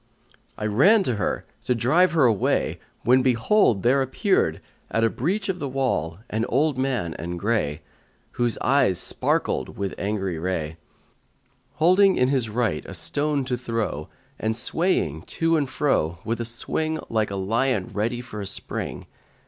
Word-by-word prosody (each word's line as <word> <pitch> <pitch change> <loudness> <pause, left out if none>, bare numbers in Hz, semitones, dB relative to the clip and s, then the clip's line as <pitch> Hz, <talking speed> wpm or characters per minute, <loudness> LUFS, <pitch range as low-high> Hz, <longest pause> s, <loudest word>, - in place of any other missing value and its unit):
I 105 - -4
ran 185 - +5
to 125 - -1
her, 100 - -2 0.2
to 125 - +1
drive 155 +10 +3
her 155 -5 +4
away, 110 -5 +1 0.2
when 125 +2 +5
behold, 125 - +3
there 135 +3 +4
appeared, 130 - +1 0.3
at 115 - 0
a 115 - +3
breach 195 - -1
of 185 -2 -2
the 140 - -3
wall, 125 - -1
an 110 +1 0
old 145 +3 +1
man 130 -10 -1
and 85 +1 -4
grey, 100 -9 -1 0.5
whose 120 -2 -1
eyes 130 -9 +3
sparkled - - -1
with 100 -1 -2
angry 95 -4 -2
ray, 80 -3 -3 1.0
holding 185 +4 +4
in 125 0 +2
his 130 -5 0
right 115 -1 -1
a - - -7
stone 145 -2 0
to 125 -1 -1
throw 115 -11 -3 0.3
and 110 0 -1
swaying 115 - 0 0.2
to 165 0 +3
and 145 -4 0
fro, 130 - 0
with 115 +1 -2
a - - -3
swing 155 +7 -1
like 110 -2 0
a 100 - -4
lion 110 +2 0
ready 115 +4 -1
for 115 -4 -8
a 100 - -4
spring. 100 - -3
120 Hz, 160 wpm, -24 LUFS, 100-140 Hz, 1.0 s, ran